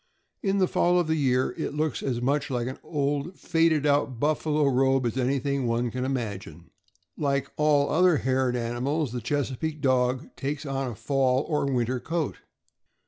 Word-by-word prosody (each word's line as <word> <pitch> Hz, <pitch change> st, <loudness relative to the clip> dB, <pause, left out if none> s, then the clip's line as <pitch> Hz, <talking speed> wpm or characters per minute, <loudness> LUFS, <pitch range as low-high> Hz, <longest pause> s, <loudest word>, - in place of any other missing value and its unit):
In 195 Hz, -1 st, +1 dB
the 185 Hz, -2 st, +3 dB
fall 175 Hz, 0 st, +2 dB
of 175 Hz, -, +1 dB
the 160 Hz, 0 st, 0 dB
year 130 Hz, -4 st, +1 dB
it -, -, -3 dB
looks 155 Hz, -2 st, -1 dB
as 120 Hz, -3 st, -2 dB
much 145 Hz, +2 st, 0 dB
like 120 Hz, -3 st, -1 dB
an 130 Hz, +1 st, -5 dB
old, 145 Hz, +3 st, -2 dB
faded 165 Hz, -3 st, +2 dB
out 140 Hz, -4 st, +1 dB
buffalo 150 Hz, +1 st, +1 dB
robe 135 Hz, -1 st, +2 dB
as 120 Hz, -, -1 dB
anything 135 Hz, 0 st, 0 dB
one 115 Hz, +1 st, 0 dB
can 125 Hz, +2 st, -3 dB
imagine. 100 Hz, -, -5 dB, 0.5 s
Like 140 Hz, -2 st, -1 dB
all 150 Hz, -2 st, +3 dB
other 180 Hz, 0 st, +4 dB
haired 130 Hz, -1 st, +1 dB
animals, 125 Hz, +4 st, -1 dB
the 125 Hz, 0 st, -4 dB
Chesa 135 Hz, +1 st, -2 dB
peake 160 Hz, -1 st, -3 dB
Dog 130 Hz, -2 st, 0 dB
takes 145 Hz, +2 st, -4 dB
on 135 Hz, -2 st, -2 dB
a 115 Hz, -, -7 dB
fall 135 Hz, +1 st, +1 dB
or 150 Hz, -3 st, 0 dB
winter 125 Hz, 0 st, 0 dB
coat. 165 Hz, +1 st, -2 dB
135 Hz, 175 wpm, -26 LUFS, 125-150 Hz, 0.5 s, other